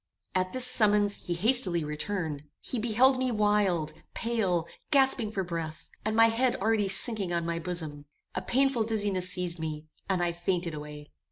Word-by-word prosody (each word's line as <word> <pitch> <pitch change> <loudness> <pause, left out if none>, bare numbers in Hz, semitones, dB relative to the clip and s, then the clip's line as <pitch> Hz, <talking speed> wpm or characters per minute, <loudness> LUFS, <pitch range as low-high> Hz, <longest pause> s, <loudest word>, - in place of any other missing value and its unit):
At 185 0 -1
this 255 -1 +7
summons 210 -4 +3
he 175 - -1
hastily 190 -4 +2
returned. 150 -1 -4
He 250 - -5
beheld 245 +4 +2
me 260 0 0
wild, 205 -7 0 0.2
pale, 200 -8 -1 0.2
gasping 265 -6 +2
for 195 -3 -3
breath, 165 -3 -7
and 215 0 -2
my 225 0 +5
head 245 +2 0
already 215 0 0
sinking 200 -2 +5
on 170 -1 -2
my 170 0 -3
bosom. 160 -4 -5 0.3
A - - -3
painful 270 -2 0
dizziness 205 -4 -1
seized 180 -2 -2
me, 155 -1 -6 0.2
and 185 -2 0
I 175 - 0
fainted 175 0 -3
away. 150 0 -10
190 Hz, 165 wpm, -27 LUFS, 170-225 Hz, 0.3 s, this